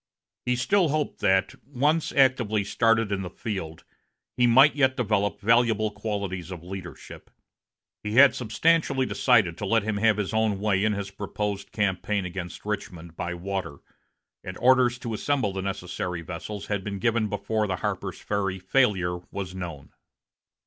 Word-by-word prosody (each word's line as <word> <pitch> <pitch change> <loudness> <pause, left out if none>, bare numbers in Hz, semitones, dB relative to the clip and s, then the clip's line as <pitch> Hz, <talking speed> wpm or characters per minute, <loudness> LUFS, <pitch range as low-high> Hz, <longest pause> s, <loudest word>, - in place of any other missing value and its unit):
He 125 - +2
still 170 +8 +2
hoped 150 0 -2
that, 95 +5 +2
once 145 +4 0
actively 120 -6 +3
started 115 +1 +2
in 100 -1 -1
the 90 - -5
field, 90 -5 -6 0.5
he 125 -1 +3
might 135 +5 +6
yet 130 -2 +2
develop 105 -4 0
valuable 115 -1 +3
qualities 100 -4 -4
of 90 -3 -8
leadership. 90 -1 -9 0.7
He 105 0 -4
had 140 +2 +8
substantially 135 +3 +1
decided 110 -11 +2
to 105 - -3
let 115 +1 +2
him 110 -1 -2
have 105 0 +3
his 105 0 -2
own 110 -3 +1
way 100 -1 +1
in 110 0 +2
his 100 -1 -4
proposed 100 0 -4
campaign 100 -1 -1
against 90 0 -7
Richmond 85 -5 -5
by 90 +1 -4
water, 95 -4 -4 0.7
and 95 0 -7
orders 125 -1 +4
to 120 -2 -5
assemble 110 -3 0
the 95 - -3
necessary 90 -2 -4
vessels 95 +4 -6
had 105 -2 -2
been 100 0 -4
given 115 +2 +1
before 105 +1 -1
the 95 - -1
Harper's - - -3
Ferry 95 -2 -2
failure 95 -4 +1
was 95 -2 -5
known. 85 -6 -7
105 Hz, 155 wpm, -26 LUFS, 95-120 Hz, 0.7 s, had